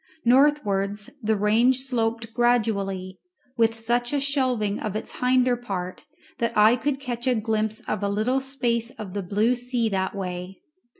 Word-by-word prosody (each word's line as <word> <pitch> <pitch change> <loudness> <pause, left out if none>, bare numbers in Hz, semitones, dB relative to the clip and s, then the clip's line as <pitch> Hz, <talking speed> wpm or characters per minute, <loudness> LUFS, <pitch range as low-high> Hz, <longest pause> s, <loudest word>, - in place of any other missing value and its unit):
Northwards 210 -7 +2
the 220 -1 +1
range 230 +5 +3
sloped 230 -3 -2
gradually, 200 -6 0 0.4
with 225 -2 +2
such 240 +3 -1
a 285 - +2
shelving 255 -7 0
of 210 -2 -4
its 215 - -6
hinder 250 0 +3
part 190 -7 -5 0.3
that 235 -2 -1
I 215 +3 +6
could 270 +2 -2
catch 245 -2 -4
a 255 - +3
glimpse 220 -1 -1
of - - -3
a 200 - 0
little 220 +6 +1
space 240 -4 -1
of 210 -7 -9
the 205 - -2
blue 210 +6 +1
sea 245 -2 -1
that 190 -1 -1
way. 180 -1 -5
225 Hz, 160 wpm, -25 LUFS, 205-250 Hz, 0.4 s, I